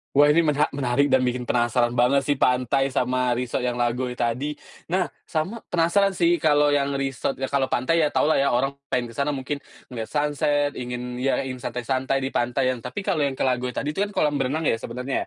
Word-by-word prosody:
Wah, 145 Hz, +1 st, +6 dB
ini 165 Hz, -, +4 dB
mena 150 Hz, -2 st, +2 dB
menarik 140 Hz, +1 st, +1 dB
dan 130 Hz, -, +5 dB
bikin 125 Hz, -1 st, -1 dB
penasaran 120 Hz, 0 st, +1 dB
banget 125 Hz, +3 st, +3 dB
sih 145 Hz, -1 st, 0 dB
pantai 125 Hz, +2 st, +2 dB
sama 125 Hz, -2 st, 0 dB
resort 125 Hz, +1 st, -2 dB
yang 125 Hz, -1 st, -1 dB
Lagoi 125 Hz, +1 st, -1 dB
tadi. 125 Hz, +6 st, -1 dB, 0.3 s
Nah, 180 Hz, +2 st, +1 dB, 0.2 s
sama 185 Hz, +9 st, -2 dB
penasaran 185 Hz, +3 st, +2 dB
sih 170 Hz, -1 st, +3 dB
kalau 145 Hz, -1 st, +3 dB
yang 140 Hz, -1 st, +1 dB
resort 135 Hz, 0 st, -2 dB
ya, 135 Hz, -, -3 dB
kalau 135 Hz, -2 st, +1 dB
pantai 150 Hz, +7 st, +1 dB
ya 155 Hz, -, +4 dB
taulah 150 Hz, 0 st, +2 dB
ya, 140 Hz, -, +3 dB
orang 135 Hz, +3 st, +1 dB, 0.2 s
pengen 120 Hz, -2 st, -2 dB
kesana 140 Hz, +4 st, -1 dB
mungkin 140 Hz, +2 st, -4 dB, 0.3 s
ngeliat 115 Hz, -3 st, -5 dB
sunset, 145 Hz, -1 st, 0 dB
ingin 125 Hz, 0 st, -5 dB
ya 135 Hz, +1 st, +1 dB
ingin 130 Hz, -1 st, -6 dB
santai-santai 130 Hz, +2 st, -2 dB
di 135 Hz, -, -2 dB
pantai 130 Hz, +2 st, +1 dB
ya. -, -, -1 dB
Tapi 200 Hz, -, -6 dB
kalau 195 Hz, -5 st, 0 dB
yang 135 Hz, -, -4 dB
ke -, -, -2 dB
Lagoi 125 Hz, -1 st, -1 dB
tadi 145 Hz, -, -2 dB
tu 155 Hz, -, -6 dB
kan 205 Hz, 0 st, +1 dB
kolam 150 Hz, -1 st, +1 dB
renang 150 Hz, +5 st, -1 dB
ya, 115 Hz, -, +1 dB
sebenarnya 125 Hz, +4 st, -3 dB
135 Hz, 210 wpm, -24 LUFS, 125-145 Hz, 0.3 s, Wah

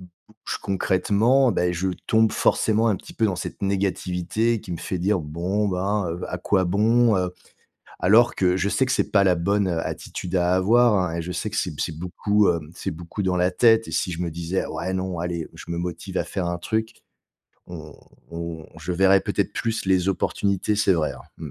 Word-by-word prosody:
bouge 90 Hz, +5 st, -9 dB
concrètement, 105 Hz, +6 st, +2 dB
ben, 90 Hz, -1 st, +1 dB
je 90 Hz, +3 st, -1 dB, 0.2 s
tombe 110 Hz, -1 st, +4 dB
forcément 110 Hz, +1 st, +2 dB
un 105 Hz, -, +2 dB
petit -, -, -12 dB
peu 110 Hz, -, +2 dB
dans 95 Hz, -3 st, -1 dB
cette -, -, -6 dB
négativité 100 Hz, +3 st, 0 dB
qui 90 Hz, -, -8 dB
me -, -, -3 dB
fait 90 Hz, -, -4 dB
dire: 95 Hz, +1 st, +1 dB
«Bon, 90 Hz, +7 st, -2 dB
ben, 95 Hz, +1 st, -1 dB
heu, 85 Hz, +2 st, -5 dB
à 90 Hz, -, -4 dB
quoi 95 Hz, +1 st, +1 dB
bon, 110 Hz, +4 st, +3 dB
heu». 90 Hz, -1 st, 0 dB, 0.7 s
Alors, 115 Hz, +6 st, +4 dB
que 90 Hz, -1 st, +2 dB
je 100 Hz, -, 0 dB
sais 130 Hz, +5 st, +2 dB
que 130 Hz, -, -2 dB
c'est -, -, +1 dB
pas 100 Hz, -2 st, +5 dB
la 90 Hz, -2 st, +4 dB
bonne, 100 Hz, +3 st, +1 dB
heu, 85 Hz, -2 st, -1 dB
attitude 90 Hz, +1 st, -5 dB
à 90 Hz, 0 st, +2 dB
avoir, 115 Hz, +4 st, +4 dB
hein, 90 Hz, -3 st, 0 dB
et -, -, -2 dB
je 90 Hz, +2 st, -5 dB
sais 110 Hz, +3 st, -3 dB
que 105 Hz, -, -7 dB
c'est 90 Hz, -, -1 dB
c'est 80 Hz, -2 st, -3 dB
beaucoup, 100 Hz, +4 st, +1 dB
hem, 80 Hz, -3 st, -2 dB
c'est -, -, -4 dB
beaucoup 85 Hz, +5 st, -6 dB
dans 90 Hz, -1 st, 0 dB
la 90 Hz, +1 st, +2 dB
tête 115 Hz, +3 st, +4 dB
et -, -, -7 dB
si 95 Hz, -2 st, -1 dB
je 85 Hz, +1 st, -4 dB
me 85 Hz, -, -1 dB
disais: 85 Hz, +3 st, -2 dB
«Ouais, 95 Hz, -, -4 dB
non, 95 Hz, -2 st, -3 dB
allez, 85 Hz, -1 st, -3 dB
je -, -, -10 dB
me 85 Hz, -, -3 dB
motive 85 Hz, -1 st, -4 dB
à -, -, +1 dB
faire 90 Hz, -, -3 dB
un 85 Hz, 0 st, -2 dB
truc», 110 Hz, +5 st, -2 dB, 0.7 s
on 80 Hz, -4 st, -9 dB, 0.4 s
on 85 Hz, -1 st, -6 dB
je 90 Hz, -, -4 dB
verrai 95 Hz, +2 st, +4 dB
peut-être -, -, -1 dB
plus 115 Hz, -2 st, -2 dB
les 95 Hz, 0 st, +2 dB
opportunités. 100 Hz, +2 st, 0 dB
C'est 100 Hz, -2 st, +3 dB
vrai, 80 Hz, -3 st, 0 dB
hein. -, -, -12 dB, 0.2 s
Mmh. 80 Hz, -3 st, -7 dB
95 Hz, 215 wpm, -23 LUFS, 85-105 Hz, 0.7 s, pas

